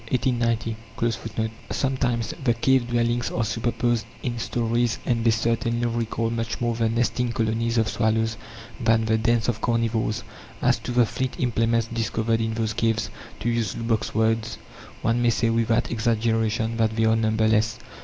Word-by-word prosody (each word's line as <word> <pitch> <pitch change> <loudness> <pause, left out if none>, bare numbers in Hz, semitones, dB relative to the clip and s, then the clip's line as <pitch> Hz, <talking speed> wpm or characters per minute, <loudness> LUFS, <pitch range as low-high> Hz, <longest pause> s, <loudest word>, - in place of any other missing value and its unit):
(4) 125 -2 +1 1.2
Sometimes 125 -4 0
the 120 -3 +3
cave 130 +1 +2
dwellings 120 0 +1
are 115 - -1
superposed 115 0 0 0.2
in 120 -3 -2
storeys, 115 0 0
and 115 -2 +1
they 115 - +4
certainly 115 +1 +1
recall 115 -1 -1
much 115 -1 -3
more 120 -1 0
the 115 -1 +1
nesting 120 +1 0
colonies 115 +1 0
of 110 -1 +3
swallows 110 0 +1 0.4
than 115 -2 +3
the 110 0 +2
dens 115 0 +2
of 115 -2 -1
carnivores. 115 -1 0 0.4
As - - +2
to - - -5
the 120 -1 +4
flint 130 +3 -3
implements 115 -2 +1
discovered 115 0 -1
in 110 0 -1
those 110 -1 -1
caves, 115 0 0 0.3
to 120 - 0
use 115 -2 0
Lubbock's 115 -2 -1
words, 110 +1 +1 0.5
"one 115 +2 +2
may 120 - +4
say 115 0 +1
without 115 0 +1
exaggeration 115 0 0
that 110 -1 +1
they 110 0 +2
are 110 0 +4
numberless." 110 0 +2
115 Hz, 155 wpm, -24 LUFS, 110-120 Hz, 1.2 s, they